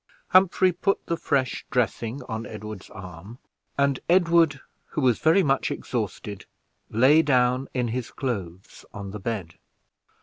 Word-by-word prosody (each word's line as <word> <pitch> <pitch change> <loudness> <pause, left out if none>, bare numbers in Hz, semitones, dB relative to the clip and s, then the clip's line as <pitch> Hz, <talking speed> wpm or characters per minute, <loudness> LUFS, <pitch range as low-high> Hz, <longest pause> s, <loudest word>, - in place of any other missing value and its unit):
Humphrey 185 0 +5
put 195 +3 -1
the 170 - -1
fresh 135 -5 -1
dressing 125 +1 -1
on 115 -1 -5
Edward's 105 -2 -8
arm; 95 +4 -10 0.4
and 140 -2 +2
Edward, 170 -5 +4 0.3
who - - -4
was 125 -4 +3
very 165 +5 +4
much 135 -3 +1
exhausted, 105 -3 -4 0.4
lay 135 +8 +5
down 130 -2 +2
in 125 -2 0
his 120 +1 -3
clothes 95 -9 -5
on 100 -1 -6
the 105 - -6
bed. 95 -6 -5
125 Hz, 135 wpm, -25 LUFS, 105-145 Hz, 0.4 s, Humphrey